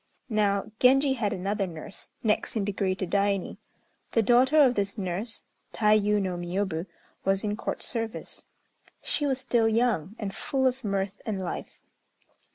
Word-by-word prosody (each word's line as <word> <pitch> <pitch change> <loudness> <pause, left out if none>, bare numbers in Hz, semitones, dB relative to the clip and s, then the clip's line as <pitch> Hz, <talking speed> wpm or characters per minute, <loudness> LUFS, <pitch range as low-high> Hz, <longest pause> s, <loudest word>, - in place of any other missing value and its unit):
Now, 210 -1 +1
Genji 270 +2 +5
had 220 -5 -1
another 195 +1 -1
nurse, 165 +2 -7
next 215 +1 0
in 210 -3 0
degree 195 -2 0
to 190 - -3
Daini. 200 0 0 0.6
The 225 - +4
daughter 250 +7 +4
of 255 -3 +4
this 200 -1 -2
nurse, 195 +4 -3 0.3
Tayû 210 -1 +3
no 185 -3 -2
Miôbu, 175 0 -2 0.4
was 195 +1 +1
in 210 -1 -1
Court - - -4
service. 225 -2 -4 0.6
She 295 - 0
was 265 -2 0
still 235 -4 +2
young, 220 -5 +1
and 200 -3 -4
full 265 -1 -1
of 260 0 +1
mirth 195 -1 -2
and 210 -4 -2
life. 185 -2 -6
205 Hz, 155 wpm, -27 LUFS, 195-230 Hz, 0.6 s, Genji